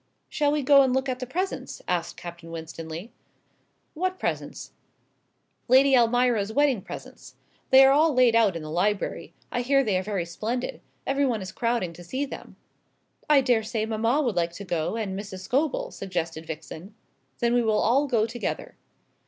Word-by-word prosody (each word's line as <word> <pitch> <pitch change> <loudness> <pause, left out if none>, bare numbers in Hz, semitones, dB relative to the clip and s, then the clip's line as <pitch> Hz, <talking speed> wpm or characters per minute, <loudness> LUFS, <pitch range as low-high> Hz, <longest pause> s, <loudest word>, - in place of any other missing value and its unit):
"Shall 290 -1 +1
we 295 -1 0
go 275 +1 +7
and 260 -1 +2
look 265 +1 0
at 255 -1 -2
the 255 - -5
presents?" 370 +9 -3
asked 175 -2 -2
Captain 170 -1 -9
Winstanley. 165 +4 -7 0.8
"What 370 +3 -2
presents?" - - -4 1.0
"Lady 265 +2 +6
Almira's 240 -3 +3
wedding 275 -4 +2
presents. - - -10 0.3
They 265 0 +8
are 270 - +6
all 310 +3 +4
laid 250 -3 +4
out 215 -6 +4
in 165 - -5
the 155 - -7
library. 195 +5 -1 0.2
I 245 - -1
hear 275 +2 +3
they 200 -6 +1
are - - -2
very 190 -3 -2
splendid. 230 - -4 0.2
Everybody 270 -6 0
is 190 - -7
crowding 230 -7 -1
to 175 - -12
see 260 +11 -3
them." - - -10 0.7
"I 290 -2 +6
daresay 225 -3 0
mamma 230 +6 +1
would 240 -7 -1
like 170 -1 0
to 200 - -8
go, 170 +2 -1
and 210 -4 -3
Mrs. 195 -2 -7
Scobel," 270 +9 -1
suggested 165 -4 -4
Vixen. 165 +5 -8 0.4
"Then 235 0 +1
we 245 - +4
will 220 -2 +2
all 275 +6 +3
go 230 -5 +2
together." 235 +1 -5
230 Hz, 170 wpm, -26 LUFS, 185-265 Hz, 1.0 s, They